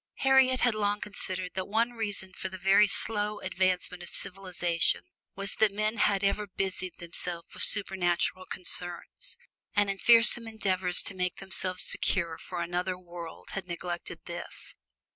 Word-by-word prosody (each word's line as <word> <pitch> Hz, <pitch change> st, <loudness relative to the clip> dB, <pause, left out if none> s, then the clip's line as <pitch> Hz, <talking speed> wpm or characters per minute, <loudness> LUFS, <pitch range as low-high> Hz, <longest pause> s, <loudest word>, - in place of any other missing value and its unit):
Harriet 265 Hz, -1 st, +5 dB
had 245 Hz, -2 st, +3 dB
long 205 Hz, -1 st, 0 dB
considered 185 Hz, -3 st, -4 dB
that 185 Hz, -1 st, -3 dB
one 230 Hz, +3 st, +1 dB
reason 205 Hz, -5 st, -4 dB
for 190 Hz, -, -5 dB
the 185 Hz, -, -8 dB
very 195 Hz, +3 st, +5 dB
slow 210 Hz, 0 st, 0 dB
advancement 185 Hz, -1 st, 0 dB
of 175 Hz, -, -8 dB
civilization 180 Hz, -3 st, +1 dB, 0.3 s
was 195 Hz, 0 st, 0 dB
that 220 Hz, -2 st, +5 dB
men 215 Hz, +2 st, -1 dB
had 200 Hz, -3 st, +2 dB
ever 205 Hz, +1 st, 0 dB
busied 190 Hz, -1 st, -4 dB
themselves 170 Hz, 0 st, -3 dB
with -, -, -1 dB
supernatural 185 Hz, -2 st, +2 dB
concerns; 180 Hz, -, -3 dB, 0.4 s
and 205 Hz, -1 st, +3 dB
in 195 Hz, -, -6 dB
fearsome 230 Hz, 0 st, +6 dB
endeavors 190 Hz, -5 st, +1 dB
to -, -, -2 dB
make 180 Hz, -1 st, -2 dB
themselves 185 Hz, -1 st, 0 dB
secure 165 Hz, -3 st, 0 dB
for 175 Hz, 0 st, -5 dB
another 180 Hz, +2 st, -2 dB
world 175 Hz, -2 st, -10 dB
had 195 Hz, -2 st, -5 dB
neglected 175 Hz, 0 st, -5 dB
this. -, -, -8 dB
190 Hz, 150 wpm, -29 LUFS, 180-210 Hz, 0.4 s, fearsome